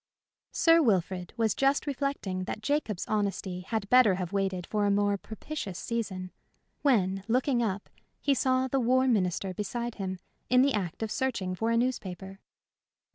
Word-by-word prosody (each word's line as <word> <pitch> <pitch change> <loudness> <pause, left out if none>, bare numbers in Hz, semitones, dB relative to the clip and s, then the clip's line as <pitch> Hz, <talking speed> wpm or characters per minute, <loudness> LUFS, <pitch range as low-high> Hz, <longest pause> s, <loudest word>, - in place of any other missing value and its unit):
Sir 330 0 +5
Wilfrid 185 - 0
was 225 -3 +2
just 275 +5 +2
reflecting 275 -10 -2
that 215 - -5
Jacob's 225 - -1
honesty 200 -3 -1
had 200 +3 -3
better 250 -6 +6
have 180 0 -4
waited 190 -3 -1
for 210 -1 0
a - - +3
more 205 0 +2
propitious 215 - -6
season, 190 -6 -3 0.5
when, 195 -8 +2
looking 250 +1 +2
up, 205 -3 -2 0.3
he 285 - +2
saw 260 -1 +2
the 270 +1 0
War 255 +2 +3
Minister 190 -4 +1
beside 235 +5 -3
him, 190 -1 -3 0.3
in 250 +1 +6
the 280 0 +2
act 190 0 -2
of 220 - -3
searching 230 -9 -1
for 225 +5 -1
a 230 - +2
newspaper. 195 -6 -3
215 Hz, 160 wpm, -29 LUFS, 190-255 Hz, 0.5 s, better